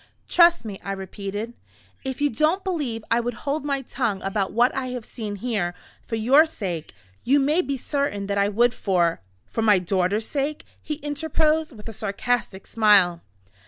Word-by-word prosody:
"Trust 340 -5 +5
me," 200 -3 -6
I 195 - -3
repeated. 200 +3 -5 0.5
"If 265 +1 -4
you 290 - +2
don't 310 - +1
believe 285 - -2
I 230 - +4
would 240 0 -2
hold 290 +2 -1
my 280 -2 -1
tongue 230 -6 -2
about 195 0 -1
what 240 +3 +3
I 265 -1 -2
have 250 -3 -5
seen 215 -4 -5
here, 200 -5 -2 0.3
for 225 - -2
your 265 +9 +5
sake, 180 - -5 0.3
you 280 +3 +4
may 300 +6 +3
be 280 -6 -3
certain 270 -7 -2
that 200 0 -2
I 200 0 +3
would 235 +4 +3
for 175 - +1
" 90 - -40
"For 225 - -1
my 210 -3 +5
daughter's," 185 +4 0 0.5
he 305 - -4
interposed, 305 -1 0
with 210 - -11
a 225 - -6
sarcastic 215 -1 -2
smile. 200 -6 +4
225 Hz, 175 wpm, -24 LUFS, 200-280 Hz, 0.5 s, Trust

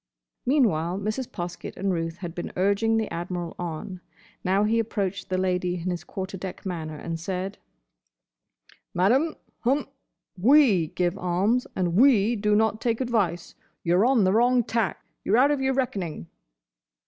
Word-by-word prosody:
Meanwhile 190 - +2
Mrs. 215 +5 -3
Poskett 175 0 -6
and 195 0 0
Ruth 165 -1 -3
had 175 -3 -6
been 175 - -5
urging 200 +4 +2
the 220 -1 0
Admiral 175 0 -4
on. 175 +2 -5 0.4
Now 190 +2 +2
he 225 +2 +2
approached 200 -4 -2
the 185 - 0
Lady 180 -1 0
in 180 +1 -3
his 175 -2 -4
quarter 190 +1 -6
deck 190 +1 -7
manner, 160 -4 -4
and 165 +2 -5
said, 185 +3 -4 1.4
"Madam—hum—we 260 - +1
give 175 -1 0
alms, 195 +8 +1
and 180 -2 0
we 235 0 +5
do 210 -1 +1
not 220 0 +2
take 230 -2 0
advice. 205 -9 -1 0.3
You 170 +1 +2
're 200 - +4
on 255 -5 +4
the 185 0 +3
wrong 245 +2 +4
tack. 225 -6 -2 0.2
You 195 - 0
're - - +6
out 275 +4 +5
of 285 -2 0
your 265 0 +1
reckoning." 195 - -2
195 Hz, 155 wpm, -26 LUFS, 175-230 Hz, 1.4 s, re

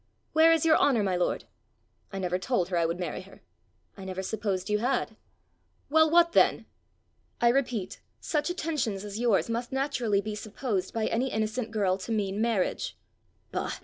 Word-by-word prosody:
Where 320 +1 +6
is 330 -1 +3
your 320 -1 +6
honour, 240 -7 +3
my 190 -2 0
lord?" 180 - 0 0.7
"I 195 - -5
never 180 -1 -1
told 190 -4 0
her 180 - 0
I 165 -1 +2
would 170 +2 -3
marry 175 -1 -3
her." 190 +1 -16 0.5
"I 195 - -10
never 190 0 -4
supposed 195 -2 -2
you 210 0 +1
had." 245 -1 -1 0.8
"Well, 315 +1 +5
what 340 +1 +5
then?" - - +3 0.7
"I 235 - +4
repeat, 240 -6 -1 0.2
such 300 0 -1
attentions 275 - -2
as 205 +1 -6
yours 235 -5 +2
must 235 +1 -3
naturally 260 -6 0
be 210 +1 -4
supposed 210 -2 -3
by 225 -1 -1
any 250 +4 0
innocent 220 +2 -2
girl 200 -3 0
to 195 - -6
mean 205 -1 -1
marriage." 225 -5 -1 0.5
"Bah! - - -2
220 Hz, 175 wpm, -28 LUFS, 190-260 Hz, 0.8 s, Where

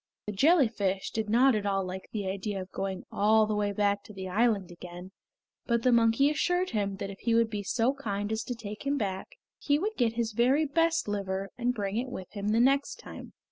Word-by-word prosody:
The 210 - -3
jellyfish 220 - +2
did 220 -1 -2
not 250 +4 +5
at 210 -2 -1
all 195 -1 +1
like 185 +1 -7
the 205 -3 -3
idea 195 +1 -3
of 185 0 -8
going 190 -1 -4
all 215 +2 +4
the 215 - -2
way 205 -1 0
back 200 0 +1
to 215 - -11
the 190 -1 -6
island 205 -2 +1
again; 175 +1 -10 0.6
but 235 -1 +1
the 255 - +4
monkey 235 +4 +4
assured 355 +4 0
him 200 -3 -1
that 195 +1 -5
if 195 - -11
he 230 -1 +1
would 230 -1 +3
be 210 -2 -2
so 230 +6 +1
kind 205 -6 -3
as 220 0 -1
to 245 - -4
take 210 -2 -8
him 285 +1 +1
back 200 - -4 0.2
he 285 -1 +2
would 420 +7 -2
get 235 -3 +2
his 230 -1 -1
very 255 +8 +3
best 330 +1 +1
liver, 195 -1 -2
and 245 0 -1
bring 200 -1 -2
it 255 +2 -2
with 190 -7 -7
him 200 -1 -4
the 220 +2 +2
next 275 +3 +3
time. - - -11
215 Hz, 225 wpm, -29 LUFS, 195-245 Hz, 0.6 s, not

